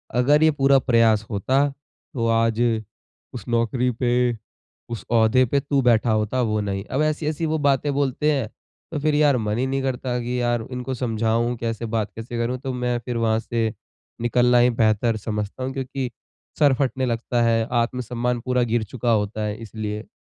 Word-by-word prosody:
अगर 145 +5 +4
ये 160 - +5
पूरा 135 -2 +4
प्रयास 115 -4 +3
होता 130 +8 +1 0.5
तो 115 -3 -1
आज 115 0 +2 0.7
उस 120 - -8
नौकरी 120 +1 +1
पे, 120 0 +1 0.5
उस 115 -2 -6
ओहदे 115 +3 +4
पे 140 +4 +1
तू 140 -1 0
बैठा 120 -2 +3
होता 110 +4 0
वो 110 -2 0
नहीं।" 100 -1 -3
अब 135 - -2
ऐसी-ऐसी 155 +1 -1
वो 160 0 0
बातें 140 +1 +1
बोलते 145 +2 +1
हैं 135 -6 0 0.4
तो 150 - -2
फ़िर 155 0 +1
यार 145 -3 +4
मन 105 -1 -1
ही 130 - +1
नहीं 135 0 -1
करता 125 -1 -2
कि 125 +1 -2
यार 120 -1 +1
इनको 125 +1 -4
समझाऊँ 115 0 0
कैसे, 115 0 -3
बात 110 -2 -2
कैसे 115 +2 -6
करूँ? 120 +2 -1
तो 130 0 -5
मैं 125 -1 -1
फ़िर 120 -2 -2
वहाँ 110 -1 +1
से 115 -1 -2 0.5
निकलना 125 +1 +3
ही 120 +1 +5
बेहतर 110 -1 +1
समझता 105 +3 -4
हूँ 130 +1 -3
क्योंकि 135 -1 -3 0.5
सर 145 -3 +5
फटने 130 -1 0
लगता 120 0 -1
है, 115 -1 +2
आत्मसम्मान 120 0 -1
पूरा 125 -1 +2
गिर 120 -1 0
चुका 120 +2 -2
होता 105 0 0
है 105 0 -2
इसलिए। 105 -1 -5
120 Hz, 180 wpm, -23 LUFS, 115-130 Hz, 0.7 s, ये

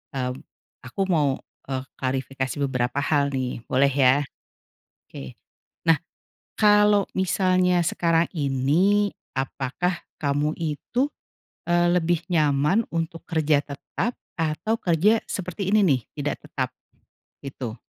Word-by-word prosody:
eee, 125 -1 -1 0.5
aku 130 +9 -4
mau, 145 -6 +2 0.3
eee, 130 -1 -2 0.2
klarifikasi 130 0 -2
beberapa 125 +1 -1
hal 140 -1 +1
nih, 125 -2 -2
boleh 140 +2 +3
ya? 130 -1 +5 0.9
Oke. 65 -2 -9 0.5
Nah, 165 -1 +5 0.6
kalau 210 -1 +5
misalnya 185 -1 +2
sekarang 165 0 +2
ini, 160 +9 +2 0.2
apakah 140 +6 -2 0.2
kamu 145 +2 +1
itu, 170 - -1 0.6
eee, 175 0 +3
lebih 175 -1 +2
nyaman 155 +5 +2
untuk 165 0 -3
kerja 155 -3 +2
tetap 150 - -4 0.2
atau 165 +6 -1
kerja 200 +4 +2
seperti 190 +1 -3
ini 215 - +5
nih, 135 -6 +3 0.2
tidak 145 0 -1
tetap? 130 -4 -2 0.7
Gitu. 130 -4 -6
155 Hz, 110 wpm, -24 LUFS, 135-180 Hz, 0.9 s, ya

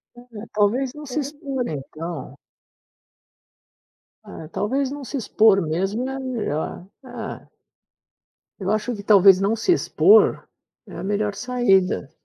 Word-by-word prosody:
É, 240 -3 -11
talvez 240 +6 +1
não 300 0 -10
se 265 +1 -3
expor 275 -3 -4
então. 150 0 -7 1.9
É, 160 - -10
talvez 260 +9 -1
não 285 -1 -7
se 275 - -5
expor 215 -4 +3
mesmo 195 +10 -2
é 270 - -5
melhor. 220 - -4 0.2
É. 240 -3 -8 1.1
Eu 190 - -3
acho 215 +3 -1
que 200 - -9
talvez 195 -2 +6
não 200 +3 +1
se 230 - 0
expor 405 +4 +4 0.4
é - - -11
a - - -6
melhor 205 0 -1
saída. 195 - +1
215 Hz, 125 wpm, -22 LUFS, 195-260 Hz, 1.9 s, talvez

